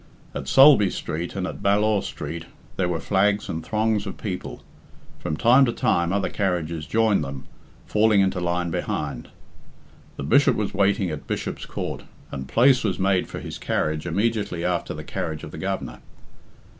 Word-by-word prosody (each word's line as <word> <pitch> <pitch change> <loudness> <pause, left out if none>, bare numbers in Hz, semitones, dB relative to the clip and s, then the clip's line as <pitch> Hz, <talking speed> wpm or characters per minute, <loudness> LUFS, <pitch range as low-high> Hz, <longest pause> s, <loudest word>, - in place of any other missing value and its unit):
At - - -5
Sulby 135 -8 +7
Street, 85 +1 -4
and 95 -2 -2
at - - -6
Ballaugh 105 +1 +3
Street, 85 -2 -6 0.3
there 95 - 0
were 85 -2 -1
flags 100 +4 +1
and 80 -2 -3
throngs 110 +1 0
of 95 - -6
people. 95 -4 -5 0.6
From 75 - -3
time 125 +8 +6
to 120 - 0
time 85 -6 +1
other 100 0 0
carriages 85 -5 -2
joined 110 -5 +2
them, 70 -1 -7 0.4
falling 105 -1 +3
into 95 -1 +2
line 85 0 -1
behind. 90 +1 -3 0.9
The - - -4
Bishop 140 - +4
was 105 -2 -2
waiting 100 -2 +2
at 75 - -7
Bishop's - - -4
Court, - - -4 0.3
and 65 -1 -5
place 125 - +4
was 100 -5 0
made 95 -1 +1
for - - -7
his - - -7
carriage 75 +2 -1
immediately 100 -1 -1
after 90 -1 -1
the - - -7
carriage 80 -1 -4
of - - -8
the - - -8
Governor. 70 -11 -4
95 Hz, 170 wpm, -24 LUFS, 85-105 Hz, 0.9 s, Sulby